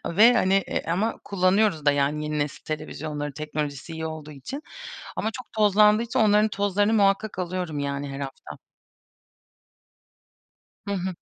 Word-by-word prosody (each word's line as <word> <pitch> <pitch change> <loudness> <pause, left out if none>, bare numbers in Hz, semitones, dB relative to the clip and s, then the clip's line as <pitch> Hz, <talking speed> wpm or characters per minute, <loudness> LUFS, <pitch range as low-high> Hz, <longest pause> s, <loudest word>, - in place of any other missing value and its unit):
ve, 220 +8 +6
hani, 190 -5 +3
eee, - - -2
ama 190 +7 0
kullanıyoruz 185 -4 +2
da, 145 - +6
yani, 145 +2 0
yeni 150 0 -2
nesil 145 0 -3
televizyonları 150 -1 -5
teknolojisi 150 0 -4
iyi 160 0 -4
olduğu 155 -1 -7
için. 150 - -7 0.5
Ama 220 - -1
çok 250 +1 -9
tozlandığı 210 0 +5
için 235 +2 -2
onların 210 0 +4
tozlarını 205 +1 +1
muhakkak 200 0 +2
alıyorum, 180 -4 -3
yani, 140 0 -3
her 135 0 -6
hafta. 135 -1 -8 2.3
Hı 200 - -2
hı. 185 -1 -3
180 Hz, 145 wpm, -25 LUFS, 150-210 Hz, 2.3 s, ve